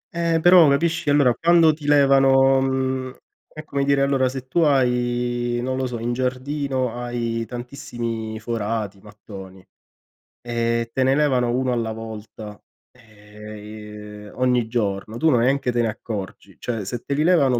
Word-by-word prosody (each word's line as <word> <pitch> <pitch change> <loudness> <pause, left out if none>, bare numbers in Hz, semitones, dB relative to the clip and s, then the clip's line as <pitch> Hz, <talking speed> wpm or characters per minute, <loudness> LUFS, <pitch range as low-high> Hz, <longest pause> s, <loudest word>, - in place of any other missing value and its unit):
Eh, 165 -1 +1
però, 175 -4 +7
capisci, 160 +1 0
allora 140 -4 +4
quando 165 0 +4
ti 150 -1 -9
levano, 135 -2 +5
mhmm, 130 -1 -1 0.4
è 155 - -9
come 140 -2 -2
dire 140 0 +2
allora 135 -2 +2
se 130 0 -7
tu 170 +6 +1
hai, 120 -3 +1
non 130 0 -2
lo 130 -1 -1
so, 120 -1 -5
in 120 +1 -2
giardino, 130 0 -2
hai 120 -1 -3
tantissimi 120 -3 -5
forati, 110 -3 -3
mattoni 95 -3 -12 0.8
e 115 -1 -1
te 130 - +1
ne 135 +1 +3
levano 130 -5 +2
1 130 -1 0
alla 115 -2 -1
volta 110 -1 -9 0.3
ehm, 105 -2 -14
i 105 0 -10
uhm, - - -12
ogni 125 -3 +2
giorno, 110 -2 -2
tu 160 +3 +2
neanche 125 +1 +2
te 120 0 0
ne - - +1
accorgi. 105 -3 -7
Cioè 115 -4 -3
se 120 +4 -4
te 140 - -2
li 150 +2 +1
levano 140 -9 +3
125 Hz, 155 wpm, -22 LUFS, 110-135 Hz, 0.8 s, però